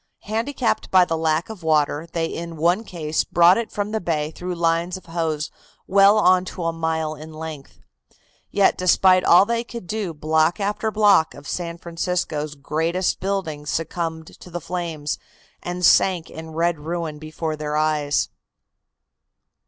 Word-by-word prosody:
Handicapped 230 +4 -1
by 185 -1 +6
the 165 - -1
lack 160 0 0
of 220 -4 -9
water, 155 0 +1
they 165 -1 -1
in 165 0 -6
one 175 +7 +2
case 160 -6 -2
brought 175 +4 +5
it 230 - -4
from 205 0 -3
the 220 0 -1
bay 155 -3 -1
through 180 +2 -5
lines 170 +2 0
of 185 - -15
hose 160 -2 -2 0.3
well 200 +2 +5
on 185 -3 +4
to 185 -1 -6
a 165 0 0
mile 160 -1 -1
in 155 +1 -10
length. 155 -3 -8 0.7
Yet 200 -1 +3
despite 185 0 +4
all 175 +3 +7
they 235 +1 -1
could 235 -4 -8
do 205 -1 -3
block 155 +3 +1
after 210 +2 -1
block 205 -7 +4
of 140 0 -12
San 170 -1 -4
Francisco's 165 -3 -3
greatest 160 +5 -1
buildings 170 -7 -3
succumbed 165 0 -3
to - - -12
the 175 0 -4
flames 165 -3 -4 0.4
and 180 0 -2
sank 180 -2 +4
in 160 0 -8
red 170 -1 +1
ruin 160 -1 -4
before 155 0 -4
their 150 0 -3
eyes. 150 -2 +1
170 Hz, 160 wpm, -22 LUFS, 155-185 Hz, 0.7 s, all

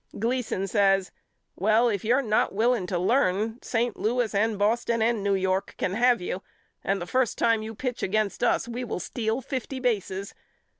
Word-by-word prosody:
Gleason 230 -3 -1
says 195 -2 +2 0.4
Well 215 +5 +3
if 205 -5 -1
you're 250 +5 +2
not 215 -3 +1
willing 225 -3 +2
to 180 - -1
learn 215 +3 +1
St. 235 -2 -1
Louis 235 0 0
and 215 +1 +1
Boston 230 +3 +1
and 225 -1 +1
New 200 0 +1
York 190 0 -1
can 185 - -1
have 245 +2 +3
you 180 +1 -4 0.4
and 195 0 0
the 175 - -4
first 255 +4 0
time 230 -1 +2
you 220 +1 -6
pitch 245 +2 -4
against 215 +1 -1
us - - +2
we 240 +1 -4
will 235 - -4
steal 220 +6 -2
fifty 265 0 -4
bases. 200 -5 -2
220 Hz, 180 wpm, -26 LUFS, 195-240 Hz, 0.4 s, Well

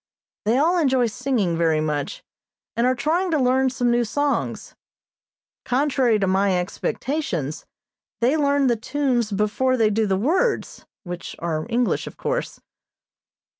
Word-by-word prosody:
They 225 +4 +3
all 340 +5 +3
enjoy 265 -5 +3
singing 235 -6 -1
very 165 -2 +2
much, 155 - -3 0.5
and 235 +2 +2
are 255 - +2
trying 325 +9 0
to 320 - +2
learn 260 0 +3
some 245 -1 0
new 240 0 +2
songs. 285 +5 -2 0.9
Contrary 260 -3 +2
to 200 - 0
my 190 0 +2
expectations, 180 - -3 0.5
they 250 +5 +2
learn 285 -2 +2
the 240 -2 +3
tunes 240 -1 -1
before 210 +6 +1
they 220 -2 +3
do 215 +1 +1
the 190 -1 +1
words, 370 - 0 0.2
which 175 -1 -7
are 160 -1 -3
English, 240 0 0
of - - -10
course. - - -3
245 Hz, 140 wpm, -23 LUFS, 200-280 Hz, 0.9 s, They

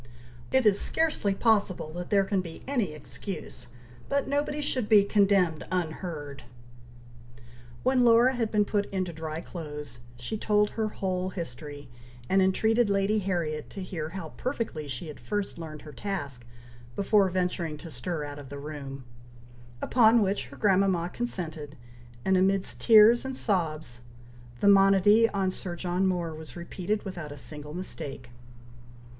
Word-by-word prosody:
It 260 -2 +3
is 205 -2 +5
scarcely 310 -11 +1
possible 200 -8 +1
that 175 +1 -6
there 200 -1 +4
can 195 -1 0
be 170 -3 -10
any 235 - 0
excuse, 155 -1 -6 0.4
but 280 0 0
nobody 290 +1 -1
should 255 -6 +1
be 210 -3 +7
condemned 195 -5 +2
unheard." 160 -5 -4 1.4
When 255 -1 +3
Laura 240 +2 +6
had 235 -3 -1
been 210 -1 +2
put 205 0 0
into 185 -3 -2
dry 160 0 -5
clothes, 150 -8 -8 0.2
she 125 - -5
told 210 -1 +2
her 220 -1 -1
whole 185 -3 -2
history, 145 -4 -7 0.4
and 190 +1 +3
entreated 220 +4 +3
Lady 200 +2 +2
Harriet 170 -6 -2
to 195 - -7
hear 160 -4 -5
how 170 -2 -6
very - - -19
perfectly 230 - -3
she 135 +3 -5
had 150 - -9
first 205 -4 -3
learned 155 -3 -8
her 150 - -10
task, 140 -10 -5 0.5
before 200 -1 +3
venturing 180 -3 -2
to 160 +2 -10
stir 150 +5 -3
out 145 0 -7
of 140 -2 -10
the 140 - -7
room; 140 -2 -7 0.8
upon 230 -2 +5
which 200 +1 -1
her - - -13
grandmama 190 -3 +2
consented, 160 -11 -4 0.5
and 190 - +3
amidst 190 +1 +1
tears 225 +1 +7
and 265 -1 -5
sobs, 155 - -1 0.6
the - - +3
monody 200 +3 +6
on 195 -2 0
Sir 180 -1 -5
John 180 +2 0
Moore 175 -3 -1
was 155 0 -10
repeated 180 +4 -3
without 175 -6 -6
a 145 - -8
single 150 +3 -8
mistake. 135 -8 -6
185 Hz, 150 wpm, -28 LUFS, 155-210 Hz, 1.4 s, be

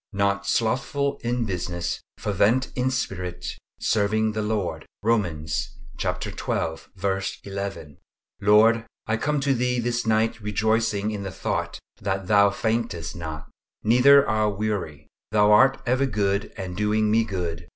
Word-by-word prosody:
"Not 100 0 0
slothful 140 +6 0
in 120 0 0
business; 85 -3 -3 0.2
fervent 105 +5 +1
in 125 +1 +1
spirit; 90 -9 -3 0.3
serving 110 +1 +1
the 110 0 -2
Lord." 105 -3 -2 0.2
Romans 85 -9 -1 0.2
xii. - - -2 1.1
11. 100 -7 -6 0.4
Lord, 110 +3 +5 0.2
I 110 +1 0
come 150 +5 0
to 135 0 +2
Thee 125 0 0
this 120 0 -1
night 110 +1 +1
rejoicing 110 0 0
in 105 -2 -4
the 100 - -4
thought - - -3 0.2
that 95 -1 -2
Thou 100 +1 +5
faintest 110 -5 -2
not, 80 -3 -7 0.3
neither 140 +5 +6
are 110 0 +2
weary: 100 -8 -3 0.2
Thou 105 0 +4
art 130 +6 +6
ever 130 +2 +2
good, 100 -3 0
and 95 -2 -5
doing 105 +1 +1
me 115 +1 +4
good. 85 -5 -4
105 Hz, 130 wpm, -25 LUFS, 100-115 Hz, 1.1 s, neither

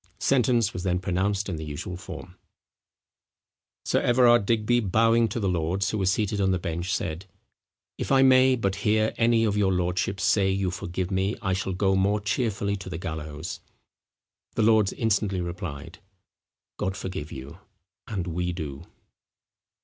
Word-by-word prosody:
Sentence 120 -4 +2
was 90 - -4
then 90 -1 0
pronounced 95 +2 -1
in 90 -5 -3
the 80 - -6
usual 80 +4 -5
form. 90 - -9 1.5
Sir - - +1
Everard 120 -4 +4
Digby 115 +1 +2
bowing 115 +2 +3
to 120 - -4
the 100 - -1
lords 90 +2 0
who 110 - -2
were 95 - 0
seated 100 +1 0
on 95 - +2
the 95 - +2
bench, 85 +1 -3
said, 85 +2 -3 0.7
"If - - -3
I 135 -1 +6
may 130 0 +6
but 100 -5 -1
hear 110 +1 +1
any 115 -1 +3
of 105 -2 +1
your 100 -2 +2
lordships 90 +2 -1
say 100 -2 +3
you 95 -1 0
forgive 90 0 -4
me, 95 +3 0
I 95 -3 -1
shall 95 0 -2
go 95 +1 +1
more 100 +2 +2
cheerfully 105 -1 -1
to 95 - -8
the - - -4
gallows." 80 +3 -6 1.0
The 110 - +2
lords 110 -3 +4
instantly 105 -4 0
replied, 85 -2 -6 0.8
"God 95 +1 -2
forgive 80 -5 -5
you, 65 +1 -9 0.5
and 100 -6 -3
we 90 +1 -2
do." 75 -5 -6
95 Hz, 160 wpm, -26 LUFS, 90-110 Hz, 1.5 s, I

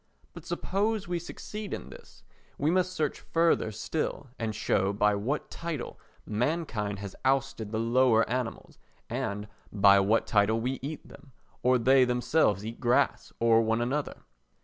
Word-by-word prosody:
But - - -11
suppose 205 +1 -1
we 175 -1 -1
succeed 210 +4 -6
in - - -10
this, - - -15 0.3
we 150 +3 +1
must 185 0 +2
search 155 -5 -2
further 165 -9 +1
still 135 +5 -3
and 110 -2 -2
show 95 0 +1
by 105 +1 +3
what 115 +9 -2
title 165 -6 -5 0.3
mankind 110 -4 -1
has 100 -1 -7
ousted 135 -5 0
the 110 - -1
lower 115 0 +3
animals, 125 -1 -4 0.3
and 105 +1 -3 0.2
by 100 -1 +6
what 105 +4 +2
title 110 +1 +2
we 125 +3 -2
eat 145 +3 -6
them, 135 - -16 0.3
or 125 0 +4
they 130 +2 +5
themselves 125 - +1
eat 115 +1 -6
grass 120 0 +1
or 115 -1 +5
one 115 0 +1
another. 135 +5 -2
125 Hz, 150 wpm, -28 LUFS, 110-150 Hz, 0.3 s, by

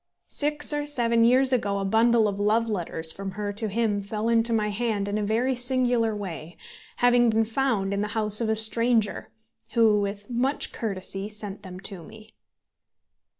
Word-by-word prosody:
Six 295 0 +2
or 295 0 -2
seven 235 -5 +2
years 260 +3 +4
ago 205 -5 0
a 195 - -2
bundle 225 +2 +3
of 200 -1 -4
love 220 +2 +1
letters 165 -4 0
from 195 +1 -6
her 205 -1 -4
to 215 +2 -2
him 210 -1 -1
fell 210 +3 -3
into 230 0 +2
my 215 -2 0
hand 210 -1 -2
in 205 - -3
a - - -2
very 230 +5 0
singular 245 -3 +1
way, 175 -5 -7 0.4
having 245 -1 +3
been 225 0 +2
found 225 -5 -1
in 200 - -1
the 210 - -1
house 210 0 +2
of 225 - -1
a 220 - +1
stranger, 220 0 +1 0.4
who, 220 -3 +3
with 200 0 -5
much 255 +4 -1
courtesy, 195 -2 -4
sent 210 -1 -6
them 185 -2 -10
to 195 -3 -4
me. 215 +5 -14
220 Hz, 180 wpm, -25 LUFS, 200-235 Hz, 0.4 s, years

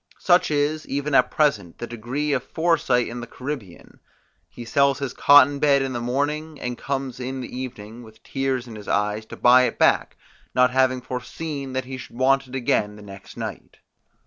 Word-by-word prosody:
Such 180 0 +3
is, 150 +1 0
even 145 +1 -2
at 125 -1 +5
present, 110 - 0
the - - -5
degree 125 +6 -3
of 130 - +1
foresight 155 -7 +1
in 120 +1 -6
the 120 - -7
Caribbean: 125 -9 -8 0.5
he 120 - -10
sells 140 +3 +2
his 140 -3 -4
cotton 145 0 +6
bed 140 -2 +3
in 135 -1 -3
the 120 - -3
morning, 145 +5 -2
and 125 0 -4
comes 135 -1 -4
in 130 +1 -4
the 125 - -8
evening, 115 -3 -7
with 110 -2 -16
tears 135 -2 -2
in 115 - -9
his 105 -1 -10
eyes, 105 +1 -1
to - - -9
buy 125 +1 +6
it - - -3
back, - - +2 0.4
not 125 0 +4
having 130 -1 +2
foreseen 135 +3 -5
that 130 0 -2
he 130 0 -6
should 120 - -11
want 135 +1 +2
it 130 - -8
again 105 -5 0
the 105 - -12
next 100 -1 -12
night. - - -7
130 Hz, 195 wpm, -23 LUFS, 120-140 Hz, 0.5 s, cotton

